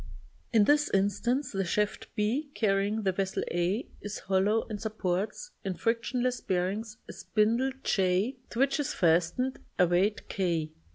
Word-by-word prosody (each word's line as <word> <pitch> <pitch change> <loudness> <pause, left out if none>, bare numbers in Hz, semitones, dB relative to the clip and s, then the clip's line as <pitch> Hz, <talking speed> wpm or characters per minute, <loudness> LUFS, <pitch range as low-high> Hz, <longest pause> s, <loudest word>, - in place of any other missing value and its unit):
In 225 -3 +5
this 295 +6 +4
instance 205 +8 +1
the 195 -1 -1
shaft 210 +3 -1
b 240 +8 0
carrying 205 0 +1
the 190 - +2
vessel 190 +1 -1
a 175 +7 0
is 205 0 -5
hollow 195 +4 +1
and 210 -2 -5
sup 220 -1 -5
ports, 195 - -2
in 190 -2 -2
frictionless 240 +5 0
bearings, 200 +4 -2
a - - -8
spindle 230 +5 +1
/ - - -34
to 190 +5 +2 0.2
which 275 +4 +2
is 290 - -1
fastened 175 +10 +2 0.2
a 180 - +6
weight 185 +5 +1
k. 170 -5 -1
210 Hz, 155 wpm, -29 LUFS, 190-235 Hz, 0.2 s, a